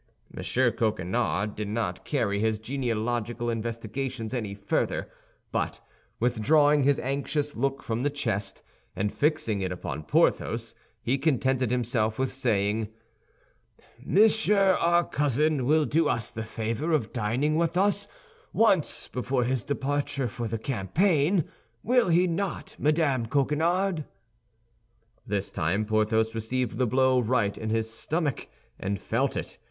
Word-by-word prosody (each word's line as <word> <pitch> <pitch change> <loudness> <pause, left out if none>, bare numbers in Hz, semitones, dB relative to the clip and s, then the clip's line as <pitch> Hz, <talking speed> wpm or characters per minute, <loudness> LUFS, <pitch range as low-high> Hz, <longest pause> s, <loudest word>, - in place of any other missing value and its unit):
M. - - -5 0.3
Coquenard 105 0 -1
did 105 -1 -4
not 105 -4 -2
carry 110 -8 0
his 110 0 +1
genealogical 120 -1 -2
investigations 115 +2 -4
any 110 -6 -3
further; 100 0 -1 0.4
but - - -2 0.4
withdrawing 145 +6 +3
his 140 +1 +3
anxious 140 +2 -2
look 135 +3 -1
from 115 +1 -2
the 145 - +1
chest 115 -8 -3 0.3
and 105 +1 -1
fixing 145 -9 0
it 95 -1 -2
upon 80 -4 -5
Porthos, - - +1 0.3
he 135 +3 +1
contented 130 -4 +1
himself 115 -3 0
with 130 0 0
saying, 110 -4 0 1.2
"Monsieur 205 +1 +4
our 170 +1 +4
cousin 145 -2 +1
will 155 +1 +4
do 160 +1 +2
us 115 -2 -1
the 110 - -5
favor 115 +8 -2
of 120 -8 0
dining 125 +7 0
with 170 +2 +1
us 200 +1 +2 0.4
once 195 -8 +2
before 125 0 -1
his 125 -2 0
departure 145 -1 -1
for 120 -1 -4
the 115 +1 -2
campaign, 145 - +1 0.4
will 245 -4 +3
he 175 +2 +4
not, 185 +2 -3
Madame 145 -6 +2
Coquenard?" 160 +6 +1 1.2
This 100 -1 -2
time 95 +7 0
Porthos 110 +1 +1
received 115 +2 -2
the 125 - +3
blow 130 +1 +3
right 115 -4 +1
in 110 - -4
his 110 0 -1
stomach, 150 +1 -2 0.3
and 100 0 -2
felt - - -1
it. - - -5
125 Hz, 130 wpm, -27 LUFS, 110-150 Hz, 1.2 s, Monsieur